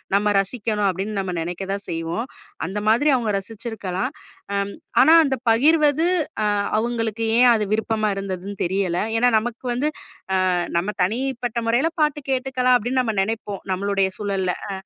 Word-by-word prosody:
நம்ம 205 Hz, +1 st, +2 dB
ரசிக்கணும் 210 Hz, -1 st, -2 dB
அப்பிடின்னு 195 Hz, +3 st, -3 dB
நம்ம 185 Hz, -1 st, -4 dB
நினைக்கத்தான் 195 Hz, +4 st, -4 dB
செய்வோம். 165 Hz, +8 st, -3 dB, 0.4 s
அந்த 200 Hz, +3 st, -3 dB
மாதிரி 290 Hz, +7 st, +4 dB
அவுங்க 230 Hz, -4 st, 0 dB
ரசிச்சிருக்கலாம். 220 Hz, +1 st, -5 dB, 0.4 s
அம், 200 Hz, 0 st, -1 dB, 0.3 s
ஆனா 320 Hz, -, +7 dB
அந்தப் 265 Hz, -4 st, -2 dB
பகிர்வது, 300 Hz, +5 st, +4 dB, 0.4 s
அ -, -, +1 dB, 0.3 s
அவுங்களுக்கு 225 Hz, -1 st, -1 dB
ஏன் 250 Hz, 0 st, +7 dB
அது 215 Hz, -2 st, +1 dB
விருப்பமா 220 Hz, 0 st, 0 dB
இருந்ததுன்னு 195 Hz, 0 st, -5 dB
தெரியல. 180 Hz, -1 st, 0 dB, 0.2 s
ஏன்னா, 245 Hz, +2 st, +4 dB
நமக்கு 240 Hz, +3 st, -4 dB
வந்து, 270 Hz, +5 st, 0 dB, 0.6 s
அ -, -, +2 dB, 0.3 s
நம்ம 190 Hz, +5 st, 0 dB
தனிப்பட்ட 240 Hz, +3 st, -1 dB
முறையில 245 Hz, +8 st, +2 dB
பாட்டு 300 Hz, -1 st, +2 dB
கேட்டுக்கலாம், 255 Hz, -1 st, +2 dB
அப்பிடின்னு 250 Hz, +3 st, 0 dB
நம்ம 225 Hz, -3 st, -1 dB
நினைப்போம். 205 Hz, -1 st, -3 dB
நம்மளுடைய 195 Hz, +1 st, +1 dB
சூழல்ல. 195 Hz, -3 st, -1 dB, 0.2 s
அ -, -, -3 dB
220 Hz, 145 wpm, -22 LUFS, 195-250 Hz, 0.6 s, ஆனா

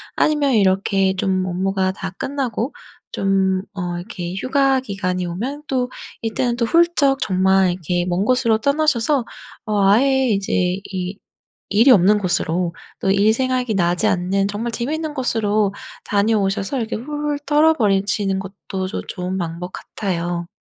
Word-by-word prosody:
아니면 295 Hz, -3 st, +2 dB
이렇게 195 Hz, -2 st, +2 dB
좀 185 Hz, 0 st, 0 dB
업무가 190 Hz, +1 st, 0 dB
다 190 Hz, 0 st, -6 dB
끝나고 260 Hz, -2 st, -2 dB, 0.4 s
좀 190 Hz, -1 st, +1 dB
어 175 Hz, -2 st, -3 dB
이렇게 175 Hz, 0 st, -6 dB
휴가 270 Hz, +4 st, +2 dB
기간이 195 Hz, -6 st, -3 dB
오면 250 Hz, +12 st, -4 dB
또 250 Hz, -2 st, 0 dB, 0.3 s
이때는 235 Hz, +2 st, -1 dB
또 235 Hz, -, +1 dB
훌쩍 305 Hz, -2 st, +3 dB
정말 190 Hz, -1 st, +3 dB
이렇게 175 Hz, 0 st, -2 dB
먼 180 Hz, +2 st, 0 dB
곳으로 230 Hz, -2 st, +3 dB
떠나셔서 280 Hz, -2 st, +1 dB, 0.4 s
어 210 Hz, -3 st, +1 dB
아예 265 Hz, +5 st, +4 dB
이제 195 Hz, -3 st, 0 dB
이 185 Hz, +1 st, -4 dB, 0.5 s
일이 220 Hz, +7 st, +5 dB
없는 205 Hz, 0 st, +5 dB
곳으로 175 Hz, -2 st, -1 dB, 0.3 s
또 195 Hz, -, -1 dB
일 205 Hz, +2 st, +4 dB
생각이 255 Hz, -2 st, 0 dB
나지 175 Hz, -1 st, +1 dB
않는 190 Hz, +2 st, +1 dB
정말 220 Hz, +4 st, -3 dB
재미있는 300 Hz, +7 st, -3 dB
곳으로 215 Hz, -5 st, 0 dB, 0.3 s
다녀오셔서 205 Hz, +2 st, +1 dB
이렇게 230 Hz, -2 st, -2 dB
훌훌 295 Hz, +4 st, -3 dB
털어 305 Hz, +2 st, +4 dB
버리시는 200 Hz, -4 st, +1 dB
것도 190 Hz, -1 st, -5 dB
조 -, -, -4 dB
좋은 185 Hz, 0 st, -4 dB
방법 175 Hz, +1 st, -4 dB
같아요. 175 Hz, -3 st, -3 dB
200 Hz, 300 characters per minute, -20 LUFS, 185-255 Hz, 0.5 s, 일이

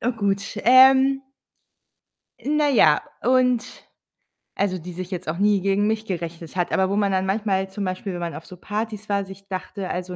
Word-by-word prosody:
Na 245 Hz, -, 0 dB
gut, 200 Hz, -1 st, -2 dB
ähm 265 Hz, +2 st, +6 dB, 1.2 s
na 295 Hz, +4 st, +1 dB
ja, 160 Hz, -, +4 dB, 0.2 s
und 250 Hz, -1 st, +1 dB, 0.7 s
also, 190 Hz, -2 st, 0 dB
die 180 Hz, +2 st, -9 dB
sich 180 Hz, +1 st, -7 dB
jetzt 180 Hz, -4 st, -5 dB
auch 165 Hz, -, -3 dB
nie 205 Hz, -1 st, +2 dB
gegen 200 Hz, +2 st, +1 dB
mich 220 Hz, 0 st, -1 dB
gerichtet 170 Hz, -2 st, -6 dB
hat, 175 Hz, -, -1 dB
aber 190 Hz, 0 st, +2 dB
wo 200 Hz, -, 0 dB
man 200 Hz, -2 st, +1 dB
dann 190 Hz, 0 st, +1 dB
manchmal 195 Hz, -1 st, -1 dB
zum 200 Hz, 0 st, -4 dB
Beispiel, 185 Hz, +1 st, -4 dB
wenn 175 Hz, -, -5 dB
man 170 Hz, -1 st, -4 dB
auf 160 Hz, -, -9 dB
so 180 Hz, -, -12 dB
Partys 215 Hz, +1 st, -5 dB
war, 200 Hz, -1 st, 0 dB
sich 195 Hz, +1 st, -12 dB
dachte 190 Hz, 0 st, -5 dB
also 180 Hz, 0 st, -4 dB
195 Hz, 190 wpm, -23 LUFS, 185-220 Hz, 1.2 s, ähm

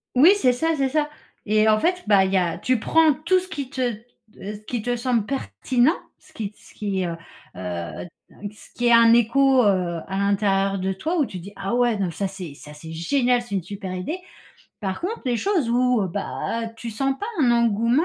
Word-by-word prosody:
Oui, 310 Hz, +9 st, +8 dB
c'est 260 Hz, -11 st, +3 dB
ça, 325 Hz, +6 st, 0 dB
c'est 270 Hz, -1 st, +1 dB
ça 300 Hz, +1 st, 0 dB, 0.4 s
et 215 Hz, +1 st, +3 dB
en 215 Hz, 0 st, +4 dB
fait, 360 Hz, +5 st, 0 dB
bah, 200 Hz, -2 st, +5 dB
il 190 Hz, -, -2 dB
y 190 Hz, -, +4 dB
a 175 Hz, -2 st, 0 dB
tu 255 Hz, -3 st, +1 dB
prends 320 Hz, +5 st, +4 dB
tout 335 Hz, +6 st, +2 dB
ce 370 Hz, -, -9 dB
qui 285 Hz, -8 st, -5 dB
te, 260 Hz, -, -3 dB, 0.6 s
heu, 205 Hz, +2 st, -6 dB
ce -, -, -24 dB
qui 240 Hz, -3 st, -2 dB
te 245 Hz, +1 st, 0 dB
semble 240 Hz, -3 st, 0 dB
pertinent, 250 Hz, -, +1 dB, 0.2 s
ce -, -, -22 dB
qui 210 Hz, -2 st, -5 dB
ce -, -, -19 dB
qui, 195 Hz, -3 st, -2 dB
heu, 170 Hz, -, -2 dB
heu, 165 Hz, -, -6 dB, 0.4 s
un 90 Hz, -, -5 dB, 0.5 s
ce 210 Hz, -, -17 dB
qui 245 Hz, -, -2 dB
est -, -, +5 dB
un 230 Hz, -1 st, +7 dB
écho, 260 Hz, +3 st, +4 dB
heu, 180 Hz, -4 st, +1 dB
à 190 Hz, 0 st, -3 dB
l'intérieur 195 Hz, -1 st, +1 dB
de 190 Hz, 0 st, -1 dB
toi 325 Hz, -, -2 dB
où 295 Hz, -, +3 dB
tu 185 Hz, -, -7 dB
dis: 195 Hz, +4 st, -10 dB
«Ah 195 Hz, +4 st, -4 dB
ouais, 240 Hz, -2 st, +2 dB
non, 195 Hz, -2 st, 0 dB
mais -, -, -4 dB
ça 195 Hz, +5 st, -2 dB
c'est 185 Hz, -5 st, -8 dB
ça 150 Hz, +1 st, -12 dB
c'est 160 Hz, +2 st, -10 dB
génial! 245 Hz, -, +1 dB
C'est 240 Hz, -4 st, -5 dB
une 190 Hz, -, -1 dB
super 190 Hz, 0 st, -6 dB
idée!» 255 Hz, -, -4 dB, 0.6 s
Par 190 Hz, -3 st, -3 dB
contre, 400 Hz, +7 st, -4 dB
les 245 Hz, -2 st, +1 dB
choses 345 Hz, -, 0 dB
où, 245 Hz, -4 st, +2 dB
bah, 225 Hz, +4 st, -3 dB
tu 230 Hz, 0 st, -6 dB
sens 270 Hz, +5 st, -1 dB
pas 415 Hz, -, -4 dB, 0.2 s
un 245 Hz, -, +4 dB
engouement, 235 Hz, -, +2 dB
230 Hz, 225 wpm, -23 LUFS, 195-265 Hz, 0.6 s, Oui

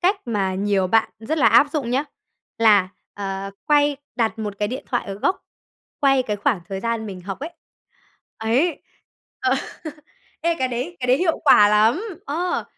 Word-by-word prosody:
cách 380 Hz, +3 st, +3 dB
mà 200 Hz, -5 st, -1 dB
nhiều 195 Hz, -1 st, +1 dB
bạn 220 Hz, +4 st, +2 dB
rất 265 Hz, +9 st, -3 dB
là 275 Hz, -, +4 dB
áp -, -, +6 dB
dụng 275 Hz, -6 st, -2 dB
nhá, 265 Hz, +4 st, +1 dB, 0.5 s
là, 210 Hz, -5 st, +5 dB, 0.3 s
ờ, 195 Hz, -1 st, -4 dB, 0.2 s
quay 290 Hz, -1 st, +3 dB, 0.2 s
đặt 225 Hz, -2 st, 0 dB
một 205 Hz, -2 st, -5 dB
cái 210 Hz, -, 0 dB
điện 255 Hz, +3 st, -5 dB
thoại 245 Hz, -, -1 dB
ở 195 Hz, -, -5 dB
góc, 365 Hz, -, -1 dB, 0.6 s
quay 270 Hz, -3 st, +4 dB
cái 210 Hz, -4 st, -3 dB
khoảng 205 Hz, -1 st, 0 dB
thời 195 Hz, -1 st, -4 dB
gian 230 Hz, -1 st, -2 dB
mình 190 Hz, -3 st, -7 dB
học 190 Hz, +1 st, -6 dB
ấy. 310 Hz, +4 st, -5 dB, 0.9 s
Ấy, 255 Hz, +10 st, 0 dB, 0.6 s
ờ. 260 Hz, 0 st, +2 dB, 0.9 s
Ê, 335 Hz, 0 st, +1 dB
cái 260 Hz, -, 0 dB
đấy 255 Hz, +9 st, -4 dB
cái 250 Hz, -, -2 dB
đấy 250 Hz, +1 st, +4 dB
hiệu 345 Hz, -2 st, +1 dB
quả 210 Hz, -7 st, +7 dB
lắm. 220 Hz, -, +3 dB, 0.2 s
Ờ, 345 Hz, +5 st, -1 dB
230 Hz, 180 wpm, -22 LUFS, 205-285 Hz, 0.9 s, quả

